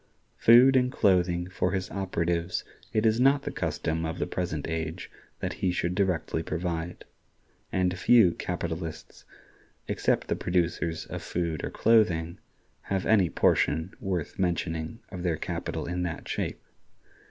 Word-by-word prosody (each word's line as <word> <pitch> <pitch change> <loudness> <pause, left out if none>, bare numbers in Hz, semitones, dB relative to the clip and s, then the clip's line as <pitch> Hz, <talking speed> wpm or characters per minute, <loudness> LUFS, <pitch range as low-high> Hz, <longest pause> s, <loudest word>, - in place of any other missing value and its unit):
Food 125 +4 +7
and 125 -1 +3
clothing 90 -4 +2
for 90 0 -1
his 95 -1 -2
operatives 85 -2 -1 0.3
it 110 +1 +1
is 110 +1 +3
not 135 +2 +4
the - - -3
custom 80 +1 -2
of 80 +2 -3
the - - -1
present 85 -5 -3
age 80 +1 -4 0.3
that - - -2
he 95 - +2
should 90 0 -1
directly 90 -4 0
provide; 85 0 -4 0.7
and 90 -1 +1
few 95 +1 +5
capitalists, 80 -3 -5 0.6
except - - 0
the - - 0
producers 85 -2 -1
of - - -6
food 85 -3 -2
or - - -2
clothing, 90 -7 +2 0.5
have 95 -1 0
any 100 -6 +4
portion 80 +3 +2
worth 95 -5 -3
mentioning 85 +2 -2
of 90 -3 -7
their 85 -3 0
capital - - -4
in 90 +1 -3
that 85 -2 -4
shape. - - -3
90 Hz, 140 wpm, -28 LUFS, 85-95 Hz, 0.7 s, Food